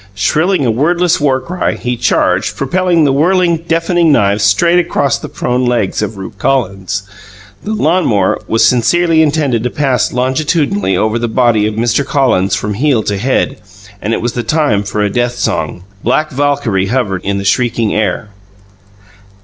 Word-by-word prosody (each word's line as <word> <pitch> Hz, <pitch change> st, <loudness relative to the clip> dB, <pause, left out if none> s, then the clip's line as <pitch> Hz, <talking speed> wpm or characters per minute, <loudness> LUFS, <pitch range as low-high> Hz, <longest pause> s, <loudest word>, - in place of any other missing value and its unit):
Shrilling 155 Hz, -, +1 dB
a 120 Hz, -, +2 dB
wordless 175 Hz, +8 st, +1 dB
war 135 Hz, -3 st, +2 dB
cry, 175 Hz, +8 st, -2 dB
he 125 Hz, 0 st, -3 dB
charged, 120 Hz, 0 st, 0 dB
propelling 175 Hz, +3 st, +1 dB
the 140 Hz, -, +3 dB
whirling, 170 Hz, +3 st, +2 dB
deafening 165 Hz, 0 st, +1 dB
knives 105 Hz, -5 st, +2 dB
straight 170 Hz, -, +3 dB
upon 140 Hz, -5 st, -1 dB
the -, -, -7 dB
prone 125 Hz, +1 st, -2 dB
legs 120 Hz, -6 st, 0 dB
of 105 Hz, 0 st, -4 dB
Rupe 95 Hz, +1 st, -9 dB
Collins. 95 Hz, -6 st, -1 dB, 0.6 s
The 215 Hz, -, -3 dB
lawn 180 Hz, -2 st, +1 dB
mower 100 Hz, -4 st, +1 dB
was 115 Hz, 0 st, +2 dB
sincerely 160 Hz, +8 st, +2 dB
intended 145 Hz, -6 st, +1 dB
to 125 Hz, -, -1 dB
pass 130 Hz, -4 st, 0 dB
longitudinally 130 Hz, -, 0 dB
over 110 Hz, +4 st, 0 dB
the 120 Hz, -, -1 dB
body 115 Hz, -3 st, +2 dB
of 110 Hz, -, -4 dB
Mr. 115 Hz, +4 st, +1 dB
Collins 130 Hz, -, +1 dB
from 105 Hz, +2 st, -3 dB
heel 125 Hz, 0 st, +1 dB
to 100 Hz, -1 st, -2 dB
head; 135 Hz, +3 st, 0 dB, 0.4 s
and 105 Hz, -, -2 dB
it 115 Hz, -, -1 dB
was 120 Hz, -, -1 dB
the 120 Hz, -, -2 dB
time 120 Hz, -5 st, +1 dB
for 105 Hz, +1 st, -3 dB
a 105 Hz, -, +1 dB
death 120 Hz, +1 st, -1 dB
song. 90 Hz, -6 st, -2 dB, 0.2 s
Black 155 Hz, +6 st, 0 dB
Valkyrie 135 Hz, -9 st, 0 dB
hovered 105 Hz, -6 st, -1 dB
in 100 Hz, 0 st, -1 dB
the 100 Hz, -, -4 dB
shrieking 115 Hz, 0 st, +1 dB
air. 105 Hz, 0 st, -1 dB
125 Hz, 170 wpm, -13 LUFS, 105-155 Hz, 0.6 s, the